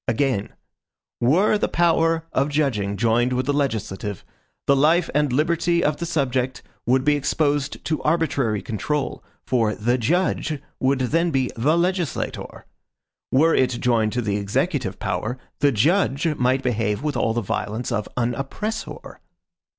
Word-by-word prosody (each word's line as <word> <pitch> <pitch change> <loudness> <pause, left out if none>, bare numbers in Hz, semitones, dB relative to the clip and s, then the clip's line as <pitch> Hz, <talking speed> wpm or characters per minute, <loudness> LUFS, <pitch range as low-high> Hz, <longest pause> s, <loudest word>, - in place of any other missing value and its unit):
Again: 115 -4 0 0.7
"Were 185 - +3
the - - +1
power 165 -1 +2
of 135 +2 +1
judging 115 -10 0
joined 120 +3 +2
with 125 +1 0
the 145 - +1
legislative, 105 - -2 0.4
the 140 - +4
life 160 +5 +3
and 150 -1 +2
liberty 170 +5 +1
of 150 0 +1
the 170 - -4
subject 130 -5 -1 0.2
would 130 +1 +3
be 150 0 +4
exposed 145 0 -1
to 155 - -1
arbitrary 140 - 0
control, 135 +8 -3 0.2
for 115 -4 +1
THE 120 +4 0
JUDGE 155 +2 0 0.2
would 130 0 +1
then 165 +7 +1
be 135 -4 0
THE 145 +9 +2
LEGISLATOR. 175 -3 -2 0.7
Were 160 +5 +4
it 125 -2 +2
joined 115 -3 +2
to 125 0 -1
the 105 -2 0
executive 110 - -1
power, 110 +8 -3 0.2
THE 145 0 +4
JUDGE 150 - +2
might 130 +1 +1
behave 115 -1 -1
with 150 -2 -1
all 115 -2 0
the 120 - +1
violence 110 +4 -3
of 105 -3 -2
AN 120 0 +1
OPPRESSOR." 210 - -5
135 Hz, 150 wpm, -23 LUFS, 115-155 Hz, 0.7 s, the